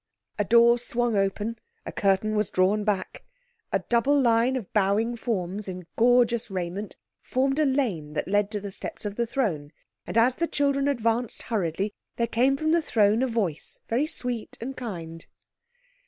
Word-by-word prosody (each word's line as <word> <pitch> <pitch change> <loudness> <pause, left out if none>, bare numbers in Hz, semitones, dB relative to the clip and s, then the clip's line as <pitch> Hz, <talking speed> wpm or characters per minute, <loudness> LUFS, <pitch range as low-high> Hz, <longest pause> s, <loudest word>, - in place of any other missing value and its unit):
A - - +3
door 235 +3 +5
swung 240 -1 -1
open, 205 +3 -1 0.3
a - - -5
curtain 200 +2 +1
was 210 -2 +1
drawn 195 +3 +2
back. 200 -3 -2 0.5
A - - 0
double 265 +5 +3
line 240 0 +3
of 235 -7 -5
bowing 215 +3 +2
forms 205 -4 -3
in 180 -1 -6
gorgeous 235 -1 +3
raiment 190 +2 -4 0.2
formed 270 +3 0
a 305 - +4
lane 220 - -1
that 150 - -2
led 205 +1 +2
to 210 -1 -3
the 200 0 -6
steps 200 - -8
of 205 - -2
the 235 +2 -1
throne, 185 - -1 0.4
and - - -2
as 245 +3 +4
the 335 - 0
children 280 -2 +1
advanced 235 -3 0
hurriedly 200 -2 -1 0.2
there 235 - +1
came 255 +4 +2
from 310 +2 0
the 335 0 +4
throne 220 -5 +2
a 260 - +2
voice 205 - -2
very 255 +7 +1
sweet 245 -6 -3
and 265 +4 -5
kind. 165 -9 -7
225 Hz, 170 wpm, -26 LUFS, 200-245 Hz, 0.5 s, door